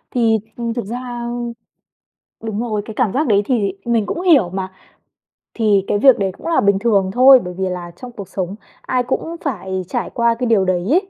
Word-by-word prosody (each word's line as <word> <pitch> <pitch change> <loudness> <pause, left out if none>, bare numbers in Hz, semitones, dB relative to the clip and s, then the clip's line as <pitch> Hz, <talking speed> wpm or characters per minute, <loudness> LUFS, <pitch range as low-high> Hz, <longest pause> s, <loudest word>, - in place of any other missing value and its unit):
Thì, 225 -2 +3 0.2
ừm, 235 -1 -2
thực 235 -4 -4
ra 240 +1 -5 1.2
đúng 220 -1 -3
rồi, 215 -4 -2
cái 220 - -8
cảm 220 -3 +1
giác 290 +3 0
đấy 205 -3 +3
thì 210 -5 0
mình 230 -3 +1
cũng 345 - -3
hiểu 290 - +5
mà, 190 0 -4 0.8
thì 210 -4 +2
cái - - +1
việc 265 +4 +5
đấy 195 -1 0
cũng - - -9
là 335 - +2
bình 200 -1 +3
thường 200 -4 +2
thôi, 260 +1 +8
bởi 180 0 -6
vì 190 -1 -1
là 175 -1 -5
trong 250 +3 -10
cuộc 200 -5 -9
sống 190 0 -4 0.3
ai 250 -1 -1
cũng 325 +6 -3
phải 190 - -3
trải 245 - -3
qua 235 -1 +1
cái 250 - 0
điều 210 -5 +3
đấy 180 0 0
ấy. 380 +4 +2
225 Hz, 210 wpm, -19 LUFS, 195-245 Hz, 1.2 s, thôi